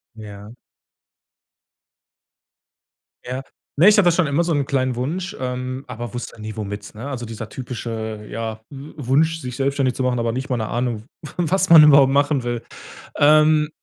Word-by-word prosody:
Ja. 105 0 -10 2.7
Ja. 125 +2 -4 0.3
Ne, 170 +7 +6
ich 210 - +6
habe 205 - +5
das 175 -1 +4
schon 180 - +2
immer 145 +4 +1
so 170 - 0
'nen 145 -2 0
kleinen 130 -3 0
Wunsch, 170 +9 -3
ähm, 130 +1 -4
aber 120 -1 -7
wusste 120 -2 -7
nie 110 +1 -7
womit, 105 0 -6
ne? 115 +6 -7
Also, 125 -4 -5
dieser 110 -1 -7
typische 110 -3 -6
ja 110 0 -5
W 140 +2 -10
Wunsch, 155 +4 +1
sich 125 -2 -6
selbstständig 135 -1 0
zu 130 - -3
machen, 125 -1 0
aber 115 -1 -1
nicht 130 +3 -5
mal 125 - +1
'ne 110 -1 -3
Ahnung, 120 -3 -2 0.2
W 155 - -8
was 185 +2 +1
man 165 -2 +10
überhaupt 140 -2 +6
machen 140 -1 +2
will. 120 -1 -3 0.5
Ähm, 155 +1 +4
130 Hz, 175 wpm, -21 LUFS, 115-145 Hz, 2.7 s, man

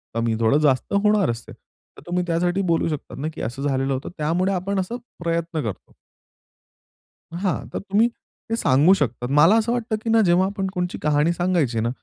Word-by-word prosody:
कमी 115 -1 0
थोडं 115 +5 +4
जास्त 140 -1 +1
होणार 210 - +3
असते. 115 0 -8
तर - - -22
तुम्ही 180 +1 0
त्यासाठी 175 +3 0
बोलू 165 - +1
शकतात 150 -3 -6
ना, 150 - -2
की - - -7
असं 120 +5 -4
झालेलं 135 0 0
होतं 130 +2 -4
त्यामुळे 170 +5 0
आपण 190 +2 -1
असा 190 +5 -3 0.3
प्रयत्न 165 -2 -1
करतो. 110 -4 -7 1.4
हां, 180 0 -2
तर - - -2
तुम्ही 205 +4 +2 0.4
ते 230 - +1
सांगू 145 - +4
शकतात. 125 -8 -2
मला 155 +9 +6
असं 225 +1 0
वाटतं, 235 -2 -1
की 225 - -2
ना, 225 0 +5
जेव्हा 175 +2 +4
आपण 195 0 -3
कोणची 180 0 -2
कहाणी 150 +2 +2
सांगायची 170 -10 0
ना, 115 - 0
170 Hz, 185 wpm, -22 LUFS, 140-190 Hz, 1.4 s, मला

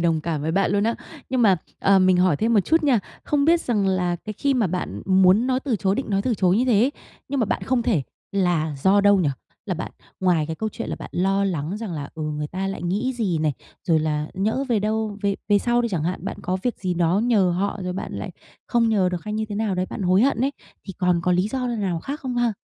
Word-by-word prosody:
đồng 165 -2 +2
cảm 155 -2 -3
với 160 +2 -1
bạn 195 -1 +2
luôn 205 +1 +2
á. 230 - +1 0.3
Nhưng 255 -1 +1
mà, 195 -5 +5 0.2
à, 195 0 +4
mình 185 -1 +4
hỏi 180 -4 +3
thêm 225 +8 +1
một 210 - +6
chút 320 - +2
nha. 275 -6 +4 0.3
Không 290 -1 +1
biết 335 +2 +4
rằng 210 -9 0
là 180 -2 +1
cái 215 +5 -7
khi 275 +6 0
mà 235 -5 +2
bạn 180 +1 -4
muốn 190 +5 +5
nói 255 0 +1
từ 265 -5 -1
chối 195 -1 +1
định 265 0 -3
nói 195 -1 +1
từ 245 0 0
chối 185 -1 +2
như 245 - +2
thế 235 -6 +3
ấy, 260 +5 +2 0.4
nhưng 275 -1 -1
mà - - +3
bạn - - -2
không 255 -2 +1
thể 220 - +1 0.3
là 175 -6 0
do 200 +2 +5
đâu 205 0 +5
nhỉ? 175 -6 +2 0.4
Là - - -1
bạn - - -6 0.3
ngoài 175 -5 +2
cái 160 0 -4
câu 220 - -2
chuyện - - -6
là - - -3
bạn - - -9
lo 195 +2 +1
lắng 170 -1 -2
rằng 215 -4 -5
là, 145 -3 -5
ừ, 160 - -5
người 150 -1 -3
ta 190 +4 -4
lại 195 -3 -4
nghĩ 205 +9 -1
gì 205 -9 -1
này, 155 -2 +1 0.3
rồi 165 -2 +3
là 150 -1 -1
nhỡ 220 +8 0
về 230 - +2
đâu 215 0 -1
về 200 -1 +1
về 205 -1 +5
sau 240 +2 +1
đi 235 - 0
chẳng 175 -8 -2
hạn, 180 +2 -3
bạn - - -4
có 185 +1 -1
việc 245 - -2
gì 185 -2 -2
đó 175 +2 +2
nhờ 205 -7 +3
họ 195 +4 -1
rồi 180 0 -3
bạn 190 - -5
lại - - -5 0.4
không 235 -2 +2
nhờ 200 -5 +2
được 180 0 -4
hay 210 0 -4
như 220 - -1
thế 210 - -4
nào 210 -2 -1
đấy, 185 0 -1
bạn - - -5
hối 185 +3 +4
hận 260 -3 +2
ấy, 275 +2 +1 0.3
thì 195 - -5
còn 180 -3 +2
có 180 - +2
lý 180 +1 +3
do 255 +2 -2
n 235 -3 -2
nào 180 -5 -1
khác 285 - -5
không 255 -2 -4
ha? 240 -2 +2
195 Hz, 280 wpm, -23 LUFS, 180-230 Hz, 0.4 s, một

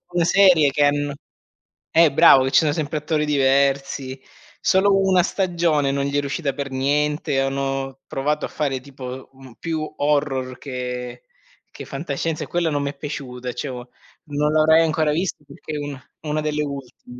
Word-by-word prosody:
una 175 -1 +2
serie 175 -5 +5
che 145 +2 +2
han 145 0 +1 0.8
eh, 165 -1 +5
bravo, 135 -1 +7
che 135 - -1
ci - - +6
sono 155 -2 +2
sempre 155 -1 -2
attori 150 0 -1
diversi, 135 -1 +1 0.4
solo 195 +1 +3
1 190 -2 +3
stagione 170 -7 +1
non 140 0 -1
gli 140 0 -2
è - - +3
riuscita 140 0 -2
per 140 0 -4
niente, 145 +2 0
hanno 135 0 -2
provato 150 +3 -1
a - - -4
fare, 135 -3 -2
tipo, 130 -1 -9
un 130 -3 -15
più 160 -2 -3 0.2
horror 140 -3 0
che 125 -2 -6 0.6
che - - -7
fantascienza, 150 +2 -3
e - - -7
quella 170 -2 0
non 145 -1 0
mi 140 - -1
è 140 - -9
piaciuta, 125 -4 -6
cioè, 145 - -4
o 125 -1 -7 0.4
non 150 0 0
l'avrai 155 +1 +5
ancora 155 -1 +1
vist 170 +5 -1
perché 155 - -9
è - - -2
una 145 -3 -6 0.2
una 155 0 -2
delle 150 0 -1
ultim 130 -3 -8
145 Hz, 175 wpm, -22 LUFS, 135-155 Hz, 0.8 s, bravo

